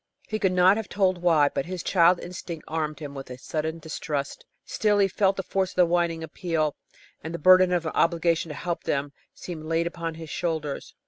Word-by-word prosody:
He 215 - -3
could 190 -3 +2
not 185 +2 +5
have 225 - -5
told 185 -3 +1
why, 160 -5 +4
but 140 - -3
his 185 -1 -5
child 175 -1 +4
instinct 175 -2 -7
armed 155 -1 -2
him 145 -2 -7
with 135 -2 -8
a 125 - -7
sudden 160 +4 -3
distrust. 150 -3 -4 0.2
Still, 210 -1 +1
he 200 -1 +4
felt 195 +1 +1
the 190 - -2
force 190 0 -1
of - - -27
the 180 - +5
whining 170 -1 0
appeal, 160 -2 -2 0.5
and 160 +2 -5
the - - -2
burden 185 +2 +6
of 175 -2 0
an 160 - -1
obligation 165 -1 +1
to 150 - -6
help 170 +3 -3
them 140 0 -1 0.2
seemed 165 -4 -7
laid 165 +1 0
upon 170 -1 -4
his 160 -1 -9
shoulders. 160 -5 -3
170 Hz, 210 wpm, -26 LUFS, 155-180 Hz, 0.5 s, burden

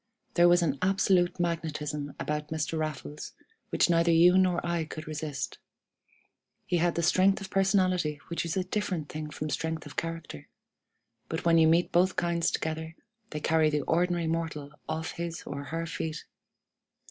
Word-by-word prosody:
There 175 0 +6
was 175 0 +5
an 145 -4 0
absolute 185 -2 +2
magnetism 155 -4 -2
about 150 0 -2
Mr. 160 +1 -2
Raffles 155 -1 -4 0.4
which - - +3
neither 170 0 +3
you 170 +2 +6
nor 185 -2 +4
I 170 -1 0
could 155 0 -7
resist. 150 -2 -4 1.1
He 175 - +1
had 170 0 +1
the 170 - 0
strength 190 +4 +4
of 195 -1 -8
personality 185 -6 +2
which 170 - -2
is 170 +1 -2
a 185 - +1
different 185 -5 -2
thing 155 0 -5
from 150 0 -5
strength 160 +2 -2
of 145 - -11
character; 165 - -5 0.8
but 160 +1 -3
when 165 -1 +5
you 160 - +6
meet 170 +2 +3
both 180 +2 +3
kinds 170 -1 +1
together, 160 0 -3 0.3
they 150 - -4
carry 160 0 +3
the 150 -1 0
ordinary 175 0 +1
mortal 160 -3 -3 0.2
off 160 0 -2
his 170 -1 -5
or 140 0 -6
her 165 +2 -3
feet. 160 -1 -4
165 Hz, 165 wpm, -29 LUFS, 155-175 Hz, 1.1 s, There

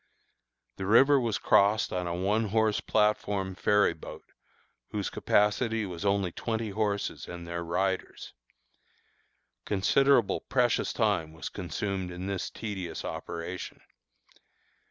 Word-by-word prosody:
The 95 - -4
river 135 +6 +6
was 115 -4 0
crossed 105 +2 +3
on 90 -1 -2
a 85 - -2
one 105 +5 +1
horse 110 0 +1
platform 105 -3 +1
ferry 105 0 +3
boat, 80 - -10 0.6
whose 105 -2 -3
capacity 110 +2 +1
was 90 -1 -6
only 100 -3 +1
twenty 110 +2 -3
horses 105 0 -2
and 85 -1 -8
their 85 0 -4
riders. 95 +3 -2 1.3
Considerable 120 +4 +3
precious 125 -3 +1
time 100 -9 0
was 80 - -6
consumed 95 0 -3
in 90 +1 -6
this 95 -1 -3
tedious 100 -6 -5
operation. 85 +1 -6
100 Hz, 115 wpm, -29 LUFS, 90-110 Hz, 1.3 s, river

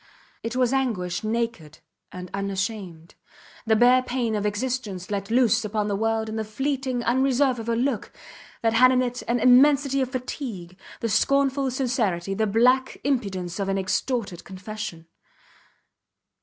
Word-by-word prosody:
It 230 +1 -4
was 255 0 +2
anguish 220 -11 -1
naked 220 -9 -3 0.3
and 180 -1 -8
unashamed, 195 -4 -4 0.5
the 220 - +4
bare 245 +3 +5
pain 245 -3 -2
of 210 -1 0
existence 210 -4 -3
let 200 -1 -3
loose 235 -1 +3
upon 210 0 -2
the 200 - 0
world 225 +1 0
in 220 0 -4
the 220 - -1
fleeting 260 +2 -2
unreserve 260 +1 +2
of 225 +1 -5
a 230 - +1
look 245 -2 -1 0.5
that 225 -1 +2
had 255 +3 +6
in 255 0 +3
it 245 0 -3
an 240 +1 +1
immensity 275 +2 +5
of 260 - -1
fatigue, 240 - -6 0.3
the 230 - 0
scornful 275 +4 +2
sincerity, 230 -8 -1
the 220 +2 0
black 250 +5 +2
impudence 195 -9 -2
of 195 -1 -1
an 195 - 0
extorted 195 0 -2
confession. 195 -3 -7
230 Hz, 150 wpm, -24 LUFS, 200-255 Hz, 0.5 s, had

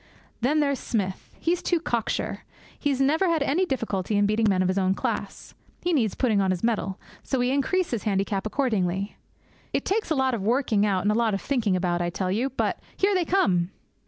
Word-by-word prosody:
Then 295 +6 +2
there's 280 -2 +1
Smith. 190 -5 -3
He's 345 +1 0
too 345 - +1
cocksure. 235 -8 -2 0.4
He 290 - 0
has 270 -2 0
never 310 +7 +3
had 325 -3 +2
any 345 +7 +1
difficulty 210 - -1
in 205 - +4
beating 215 +2 +2
men 185 -1 +2
of - - +1
his 185 +1 +1
own 190 0 +2
class. 215 -5 -4 0.3
He 355 - +1
needs 225 - +1
putting 220 -6 +2
on 190 - +1
his 185 +1 -1
mettle. 210 -4 0 0.2
So 265 - -2
we 245 0 +1
increase 335 +7 +1
his 235 -4 -1
handicap 195 0 -1
accordingly. 200 -6 -1 0.6
It - - 0
takes 415 +1 0
a 315 - +2
lot 265 -1 +2
of 230 - -2
working 220 -1 +2
out, 190 -3 +1
and 205 - +3
a - - +2
lot 225 -2 +2
of 195 - -4
thinking 230 -9 +1
about, 175 -1 0
I 175 - 0
tell 185 +1 -2
you. 235 +7 0
But 265 - -1 0.2
here 400 +1 +3
they 365 -3 +1
come!' 185 - +2
225 Hz, 215 wpm, -26 LUFS, 195-280 Hz, 0.6 s, in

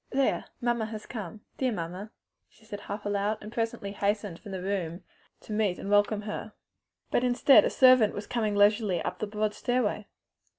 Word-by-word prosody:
"There! 270 0 +1
mamma 240 -3 0
has 215 -1 -7
come! 210 -3 -7 0.2
Dear, 260 - +2
dear 230 - -2
mamma!" 180 +5 -6 0.4
she 220 - -24
said 205 -2 -7
half 205 +1 -7
aloud, 205 +1 0
and 210 - -9
presently 225 -4 -3
hastened 205 -3 -2
from 205 - -10
the 185 -1 -5
room 185 -3 -3 0.4
to 215 - -7
meet 210 -4 +1
and 200 - -5
welcome 205 +1 +3
her. 210 0 -6 0.6
But 245 - +2
instead 250 +2 +6
a - - +2
servant 255 -5 +5
was 205 - -5
coming 220 -4 -1
leisurely 205 -2 +3
up - - -4
the 215 - -2
broad 210 0 -1
stairway. 235 -4 -1
210 Hz, 185 wpm, -28 LUFS, 200-225 Hz, 0.6 s, instead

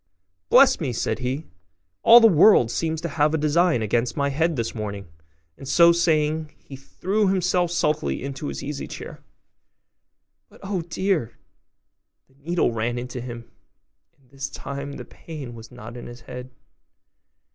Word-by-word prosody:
'Bless 265 +2 +6
me!' 140 -8 -2
said 115 - -2
he, 130 +5 -3 0.6
'all 235 +1 +9
the 230 - +5
world 175 - +6
seems 160 +2 -2
to 170 - -3
have 150 0 +1
a - - +1
design 155 -3 +2
against 120 +6 -1
my 140 -1 +1
head 160 +4 0
this 115 -3 -3
morning': 100 -3 -6 0.5
and 135 - -9
so 170 +4 +6
saying, 155 -2 +1
he 135 - -12
threw 195 +10 -1
himself 180 -2 +1
sulkily 155 -4 -1
into 140 +1 -5
his - - -5
easy 145 0 -5
chair; - - -9 1.3
but, - - -19
oh 195 -2 -2
dear! 170 - -2 0.9
the - - -29
needle 160 +2 -1
ran 115 +2 -2
into 125 0 -5
him; 120 -1 -9 0.7
and 130 -1 -30
this 135 0 -5
time 140 +1 -6
the - - -8
pain 145 -7 -9
was 115 0 -12
not 110 +3 -10
in 120 - -8
his 120 0 -11
head. 125 0 -9
145 Hz, 155 wpm, -23 LUFS, 125-170 Hz, 1.3 s, all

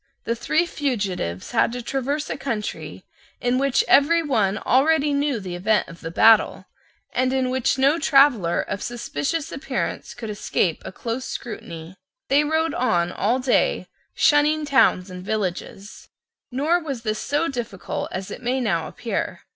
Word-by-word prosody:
The 230 - -1
three 310 +8 +1
fugitives 200 - -3
had - - +2
to 245 - -4
traverse 275 +4 -2
a - - -2
country 230 -7 -5 0.3
in 245 +1 +1
which 275 -1 +2
every 330 +5 +5
one 215 -9 +1
already 290 +4 +2
knew 280 -3 0
the 185 -3 -6
event 205 +4 +1
of 165 0 -12
the 165 - -5
battle, 220 +6 +4 0.5
and 255 0 +1
in 260 -1 0
which 260 0 +1
no 275 +5 +3
traveller 270 - +4
of 200 - -5
suspicious 285 +6 -3
appearance 275 - -4
could 225 -3 -6
escape 195 -5 -1
a - - -7
close 235 +6 -4
scrutiny. 170 -6 -7 0.3
They 285 +2 +4
rode 315 +1 0
on 175 -8 +1
all 225 +7 +1
day, 255 -1 +1 0.3
shunning 300 +1 +3
towns 235 -9 +3
and 180 0 -8
villages. 195 0 -4 0.4
Nor 300 +7 +1
was 275 -7 -5
this 215 -1 -2
so 295 +3 0
difficult 235 - -4
as 185 +1 -5
it - - -7
may 255 +2 0
now 170 -10 0
appear. 235 - -4
250 Hz, 155 wpm, -23 LUFS, 205-285 Hz, 0.5 s, every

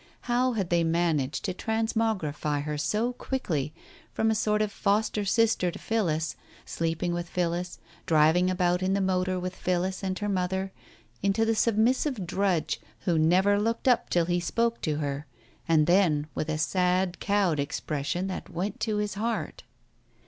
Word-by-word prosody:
How 250 +1 +1
had 195 -6 -2
they 170 -1 +3
managed 160 -5 0
to 185 - -1
transmogrify 220 -10 -1
her 150 0 -3
so 210 +12 0
quickly, 165 - -2 0.4
from 220 0 +1
a - - +3
sort 210 0 +1
of 210 - -2
foster 210 +1 0
sister 225 -3 +2
to - - -7
Phillis, 165 -8 -1 0.3
sleeping 165 +1 -2
with 175 0 -4
Phillis, 175 0 -2 0.3
driving 160 +3 +4
about 180 -1 +1
in 185 +1 +1
the - - +1
motor 185 -1 0
with 185 +1 -4
Phillis 185 +2 -1
and 190 -1 -2
her 205 - -3
mother, 190 0 -1 0.5
into 200 +3 +2
the 225 - +2
submis 225 +3 +3
sive 255 -11 -2
drudge 170 -5 0 0.2
who 165 +3 +1
never 190 +6 +4
looked 230 +4 -1
up 245 -2 +3
till 175 -1 +2
he 175 +1 +1
spoke 230 +6 0
to 155 - 0
her, 145 -1 -3 0.4
and 160 -2 +4
then 170 -4 +3
with 155 - -3
a 155 - 0
sad 180 +2 +1
cowed 200 -7 +1
expression 145 +4 -2
that 190 - -5
went 185 +4 -3
to 215 -2 -1
his 210 -1 -1
heart 225 +2 -3
185 Hz, 165 wpm, -27 LUFS, 165-210 Hz, 0.5 s, driving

